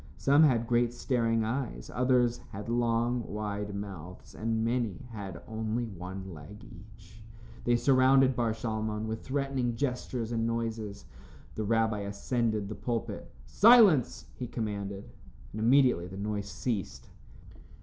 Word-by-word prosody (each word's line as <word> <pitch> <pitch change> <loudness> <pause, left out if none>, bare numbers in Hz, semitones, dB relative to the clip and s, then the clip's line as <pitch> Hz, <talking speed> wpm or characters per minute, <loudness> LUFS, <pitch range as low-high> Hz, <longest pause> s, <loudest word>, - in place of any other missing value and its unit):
Some 140 - +4
had 120 -5 +2
great 120 0 +2
staring 115 -3 +1
eyes, 110 - -3
others 125 -1 +2
had 105 +3 -6
long 120 +1 +1
wide 105 -1 -4
mouths, 95 -3 -8
and 115 0 -1
many 120 0 -1
had 100 -5 -7
only 110 +1 -2
one 95 -2 -7
leg 85 +8 -11
each. 105 +2 -15 0.4
They 120 - +4
surrounded 130 +1 +4
Bar 115 -2 +1
Shalmon 110 -1 -3
with 110 0 -4
threatening 135 -3 -1
gestures 125 -2 -2
and 115 -1 0
noises. 115 -3 -3 0.5
The 110 - -3
rabbi 110 0 +1
ascended 105 +1 -1
the 110 - -5
pulpit. 115 0 -4
"Silence!" 210 - +6
he 125 - -6
commanded, 100 -4 -4 0.4
and 110 - -5
immediately 120 -7 +4
the 95 +2 -9
noise 100 0 -3
ceased. 110 -6 -4
115 Hz, 130 wpm, -30 LUFS, 105-120 Hz, 0.5 s, Silence